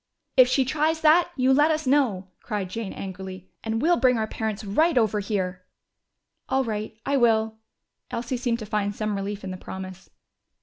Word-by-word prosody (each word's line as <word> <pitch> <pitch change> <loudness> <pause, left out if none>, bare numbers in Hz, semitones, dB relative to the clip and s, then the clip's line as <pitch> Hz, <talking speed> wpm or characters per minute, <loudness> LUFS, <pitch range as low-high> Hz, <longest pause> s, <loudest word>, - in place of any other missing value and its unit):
"If 255 -2 +8
she 260 +1 +2
tries 310 +4 0
that, 325 +3 +5
you 260 0 +3
let 295 +3 +5
us 310 -1 0
know," 250 -9 +2
cried 205 -5 -4
Jane 225 -2 -4
angrily, 190 -1 -8
"and 225 +2 -2
we'll 345 +2 +4
bring 255 -2 +4
our 220 - 0
parents 220 -1 -4
right 310 +10 +2
over 215 -3 +2
here!" 190 -3 -2 0.9
"All 265 0 +2
right, 215 -2 -4
I 280 0 +2
will." 220 -2 +2 0.5
Elsie 240 +2 -3
seemed 240 -2 0
to 220 - -7
find 205 -1 -1
some 215 -1 -2
relief 200 +1 -4
in 190 - -5
the 185 - -5
promise. 190 0 -8
220 Hz, 180 wpm, -25 LUFS, 200-265 Hz, 0.9 s, If